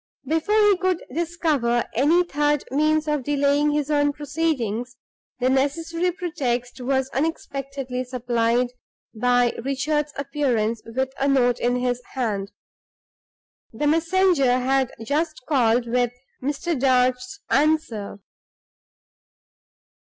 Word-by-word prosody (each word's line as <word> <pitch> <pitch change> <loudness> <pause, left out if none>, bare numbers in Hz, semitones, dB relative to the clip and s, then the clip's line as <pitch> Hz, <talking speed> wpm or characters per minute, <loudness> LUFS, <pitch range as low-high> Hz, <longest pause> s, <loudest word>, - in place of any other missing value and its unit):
Before 325 +8 0
he 415 -2 +5
could 370 -2 0
discover 310 -8 0
any 310 +9 +4
third 295 -3 0
means 305 +2 +2
of 300 -2 0
delaying 285 +1 +2
his 295 0 -1
own 290 -1 +2
proceedings, 265 -6 -2 0.4
the 250 - +1
necessary 325 +6 0
pretext 265 -9 -3
was 265 +1 0
unexpectedly 275 -3 -3
supplied 240 -1 0 0.4
by 245 +1 +2
Richard's 295 +3 -1
appearance 255 -6 -1
with 260 +3 -2
a 275 - +1
note 245 -3 +3
in 245 +1 +1
his 250 0 -1
hand. 205 -6 -2 1.2
The 230 +7 -3
messenger 330 -4 +3
had 265 0 +1
just 310 +1 -1
called 240 -4 +2
with 245 +1 +1 0.3
Mr. 290 +6 -2
Darch's 255 +3 +1
answer. 280 -9 +1
275 Hz, 110 wpm, -23 LUFS, 245-305 Hz, 1.2 s, he